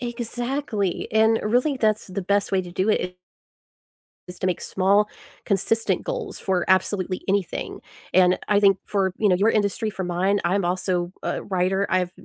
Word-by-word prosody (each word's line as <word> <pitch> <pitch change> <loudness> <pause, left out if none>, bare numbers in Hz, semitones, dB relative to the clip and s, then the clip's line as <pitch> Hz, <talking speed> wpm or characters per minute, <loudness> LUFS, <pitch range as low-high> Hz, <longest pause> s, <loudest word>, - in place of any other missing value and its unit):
Exactly, 240 -4 -3
and 220 +1 +4
really 250 +7 +1
that's 215 -3 +1
the 190 0 -4
best 200 +2 0
way 190 - +3
to 180 -1 -9
do 185 +3 -1
it 180 -4 0 1.1
is 180 - -9
to 185 - 0
make 180 - -1
small, 200 +2 +2 0.4
consistent 220 +3 +1
goals - - -4
for 185 -2 0
absolutely 185 -1 +1
anything. 195 -2 -2 0.3
And 180 0 +4
I 205 -1 +4
think 195 -2 +4
for, 190 -3 0
you 215 - +3
know, 180 - +4
your 210 +4 +3
industry, 210 +1 0
for 195 -2 -4
mine, 185 +3 0
I'm 185 +2 +1
also 180 0 -1
a - - -2
writer. 190 +1 0
I've 180 -1 +1
195 Hz, 165 wpm, -23 LUFS, 185-215 Hz, 1.1 s, and